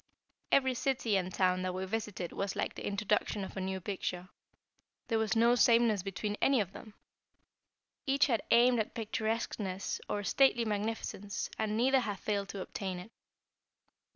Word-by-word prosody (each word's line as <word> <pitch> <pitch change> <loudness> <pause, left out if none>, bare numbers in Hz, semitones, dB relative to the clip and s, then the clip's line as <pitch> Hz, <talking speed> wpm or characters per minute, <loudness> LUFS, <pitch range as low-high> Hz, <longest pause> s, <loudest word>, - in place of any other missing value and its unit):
Every 260 -1 +4
city 250 -4 0
and 185 -1 0
town 185 0 +2
that 185 0 -2
we 190 +1 -2
visited 205 -3 -3
was 195 -1 -2
like - - -2
the - - -6
introduction 205 0 0
of 190 - -7
a 190 - -3
new 190 0 -2
picture. 185 -1 -4 0.8
There 225 -2 +2
was 220 -1 0
no 235 +1 +5
sameness 230 -4 +4
between 205 +2 -3
any 270 -2 +4
of 195 -4 -1
them. 215 -2 -11 1.1
Each 275 +2 +4
had 235 -6 +1
aimed 240 0 +5
at 215 - -2
picturesqueness 220 -3 -2
or 205 - -1
stately 240 +1 +3
magnificence, 205 -1 -3
and 215 0 0
neither 265 +3 +4
had 210 -5 -3
failed 200 0 -2
to 195 - -5
obtain 185 0 -4
it. 180 +6 -10
210 Hz, 160 wpm, -32 LUFS, 190-230 Hz, 1.1 s, no